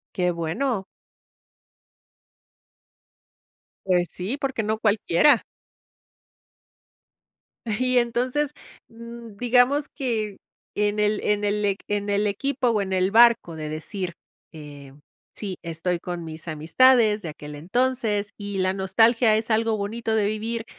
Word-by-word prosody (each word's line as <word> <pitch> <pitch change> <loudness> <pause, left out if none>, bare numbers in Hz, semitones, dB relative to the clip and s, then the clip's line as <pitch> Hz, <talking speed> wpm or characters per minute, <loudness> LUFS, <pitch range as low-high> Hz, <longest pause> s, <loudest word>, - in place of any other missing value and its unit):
Qué 180 -1 +1
bueno. 190 +7 -2 3.0
Pues 180 -2 +2
sí, 190 +11 -3
porque 270 -5 -2
no 215 +1 -1
cualquiera. 220 - +3 2.4
Y 255 0 +2
entonces, 250 +4 0 0.4
mm, 235 -2 -11
digamos 250 +5 +3
que 220 -7 -3 0.4
en 210 0 0
el, 210 0 +2
en 210 0 +1
el 205 0 0
eq 200 -1 0
en 205 0 -2
el 205 +1 +1
equipo 260 +5 -1
o 220 -3 +1
en 190 -1 -3
el 185 0 +2
barco 230 -5 +5
de 155 -1 -5
decir: 175 +4 -5 0.4
"Eh, 145 -3 -11 0.4
sí, 195 -4 -5
estoy 170 +1 -2
con 175 -1 -5
mis 160 +1 -9
amistades 210 +7 +3
de 165 - -4
aquel 150 -1 -9
entonces 210 - -1
y 205 -2 -5
la 185 0 +1
nostalgia 220 +4 +3
es 220 +2 -1
algo 220 0 +1
bonito 220 +3 -3
de 215 -2 +2
vivir" 225 +2 -3
210 Hz, 125 wpm, -24 LUFS, 185-235 Hz, 3.0 s, barco